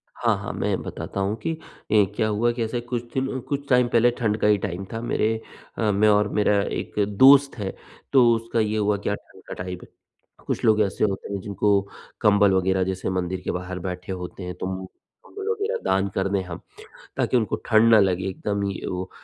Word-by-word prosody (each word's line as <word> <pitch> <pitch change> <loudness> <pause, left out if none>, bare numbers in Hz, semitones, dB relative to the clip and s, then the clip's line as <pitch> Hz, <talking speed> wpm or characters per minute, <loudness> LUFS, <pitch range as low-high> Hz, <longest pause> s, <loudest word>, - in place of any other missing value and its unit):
हाँ, - - +1
हाँ - - -5
मैं - - -1
बताता 100 - -6
हूँ 100 +2 0
कि 165 - +1 0.4
ए 105 -2 +5
क्या 110 -1 +1
हुआ 110 +3 +1
ऐसे 115 +2 -2
कुछ 120 0 -4
दिन 130 0 -1
कुछ 140 0 -3
टाइम 125 -1 +4
पहले 120 0 +4
ठंड 110 -2 +1
का - - +4
ही 105 -1 +5
टाइम 95 0 -4
था 115 - -3
मेरे 115 -2 0 0.5
अ, 110 -2 +1
मैं 105 +2 +3
और 105 0 +4
मेरा 105 -1 +3
एक - - -4 0.3
दोस्त 140 0 +7
है 100 -3 -4 0.4
तो 130 -3 +7
उसका 115 +1 -2
ये 110 0 0
हुआ 105 -1 +1
क्या 105 - +1
ठंड - - -18
का - - -6
टाइम 90 0 -5
है - - -14 0.6
कुछ - - -2
लोग 110 -1 +4
ऐसे 100 -2 0
होते 100 0 -3
हैं 100 - -2
जिनको 100 0 +1 0.4
कंबल 100 -2 +5
वगैरह 95 0 +2
जैसे 95 0 -3
मंदिर 95 0 -2
के - - -3
बाहर 90 0 -5
बैठे 90 +1 -5
होते 90 0 -6
हैं 90 - -5
तो 90 - -5
मु 95 0 -7
कंबल 410 - -12
वगैरह 450 +2 -1
दान 95 +1 +1
कर 95 0 +1
दे 100 -1 0
हम, 90 -2 -8 0.6
ताकि 125 - +2
उनको 110 -5 0
ठंड 115 0 +5
ना 110 - +8
लगे 95 -2 +1
एकदम 100 +2 -3
ही 100 - -4
वो 90 0 -4
105 Hz, 210 wpm, -24 LUFS, 95-115 Hz, 0.6 s, ना